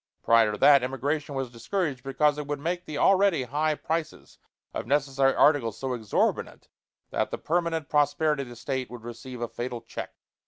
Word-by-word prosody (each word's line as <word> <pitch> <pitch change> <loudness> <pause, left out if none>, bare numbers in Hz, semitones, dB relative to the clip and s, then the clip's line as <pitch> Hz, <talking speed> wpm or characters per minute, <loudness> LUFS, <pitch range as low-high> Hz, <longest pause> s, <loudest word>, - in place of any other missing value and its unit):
Prior 115 -2 +5
to 105 - -4
that, 140 +5 +7
immigration 140 +3 -2
was 135 -2 -3
discouraged 140 - -2
because 150 +2 +1
it 150 - -5
would 145 0 -2
make 175 +4 -3
the 155 - -5
already 190 -3 +4
high 150 +5 0
prices 160 +1 -4 0.3
of - - -4
necessary 135 -1 +2
articles 135 -8 +3
so 135 -1 -3
exorbitant 110 -4 -1 0.4
that - - 0
the - - -4
permanent 165 -2 -1
prosperity 150 0 +2
of 130 - -7
the 120 - -10
State 130 +2 -3
would 120 -2 -10
receive 120 +1 -8
a 120 - -1
fatal 120 0 -5
check. - - -7
140 Hz, 180 wpm, -27 LUFS, 125-155 Hz, 0.4 s, that